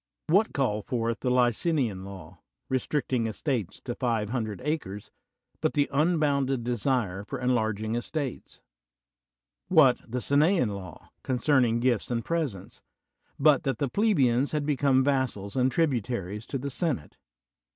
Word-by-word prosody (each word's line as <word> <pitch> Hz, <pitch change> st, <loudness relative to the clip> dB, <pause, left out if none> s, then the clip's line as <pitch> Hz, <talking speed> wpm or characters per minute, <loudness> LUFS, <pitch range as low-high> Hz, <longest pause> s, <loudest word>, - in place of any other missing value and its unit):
What 200 Hz, +7 st, +3 dB
called 105 Hz, -7 st, -1 dB
forth 115 Hz, -1 st, -1 dB
the 125 Hz, -, -1 dB
Licinian 125 Hz, -, +1 dB
Law, 95 Hz, -3 st, -10 dB, 0.3 s
restricting 130 Hz, -2 st, 0 dB
estates 115 Hz, -, -3 dB
to 120 Hz, -, -4 dB
five 115 Hz, -5 st, -1 dB
hundred 110 Hz, -5 st, -3 dB
acres, 105 Hz, -11 st, -3 dB, 0.5 s
but -, -, 0 dB
the 145 Hz, -1 st, +3 dB
unbounded 140 Hz, -5 st, +1 dB
desire 120 Hz, -5 st, -1 dB
for 135 Hz, +6 st, -5 dB
enlarging 110 Hz, -4 st, 0 dB
estates? 130 Hz, +3 st, -4 dB, 1.1 s
What 155 Hz, -8 st, +5 dB
the 125 Hz, -, -2 dB
Gineian 145 Hz, -, +3 dB
Law, 95 Hz, -5 st, -9 dB
concerning 125 Hz, -2 st, +2 dB
gifts 120 Hz, -4 st, +1 dB
and 115 Hz, -2 st, -2 dB
presents, 150 Hz, -, -3 dB, 0.6 s
but 145 Hz, -1 st, +5 dB
that 135 Hz, -4 st, -1 dB
the 140 Hz, -, -1 dB
plebeians 140 Hz, -, +2 dB
had 150 Hz, -1 st, 0 dB
become 140 Hz, -2 st, +3 dB
vassals 130 Hz, -8 st, -1 dB
and 130 Hz, 0 st, +2 dB
tributaries 120 Hz, -, -1 dB
to 135 Hz, -, -3 dB
the 140 Hz, +2 st, -4 dB
senate? 145 Hz, -, -3 dB
125 Hz, 130 wpm, -27 LUFS, 110-145 Hz, 1.1 s, What